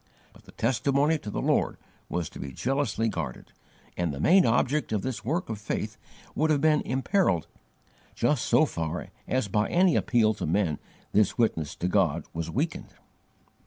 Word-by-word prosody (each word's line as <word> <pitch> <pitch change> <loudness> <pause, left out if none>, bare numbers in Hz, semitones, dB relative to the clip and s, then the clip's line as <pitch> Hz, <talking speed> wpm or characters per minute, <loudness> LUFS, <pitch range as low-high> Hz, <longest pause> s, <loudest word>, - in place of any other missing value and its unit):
But - - -19
the - - -14
testimony 140 +6 +1
to 105 - -7
the - - -3
Lord - - +1 0.3
was 85 -2 -2
to - - -11
be 70 - -6
jealously 125 - 0
guarded, 80 - -5 0.4
and 85 -3 -1
the 70 - -6
main 180 - +5
object 130 +6 +1
of 105 -3 0
this 120 -4 -4
work 160 - -1
of 110 -2 -5
faith 100 - -3 0.4
would 155 +2 +1
have 150 -2 +3
been 155 0 +3
imperilled 130 - +1 0.7
just 120 +1 +1
so 155 - +4
far 85 - -4 0.2
as 130 -4 0
by 105 +2 0
any 180 -2 +4
appeal 110 -3 +3
to - - -4
men 85 -3 +1 0.3
this 105 -2 +2
witness 85 -10 0
to 90 - -2
God 85 -5 +1
was 85 0 -4
weakened. 145 - -3
115 Hz, 170 wpm, -27 LUFS, 90-145 Hz, 0.7 s, main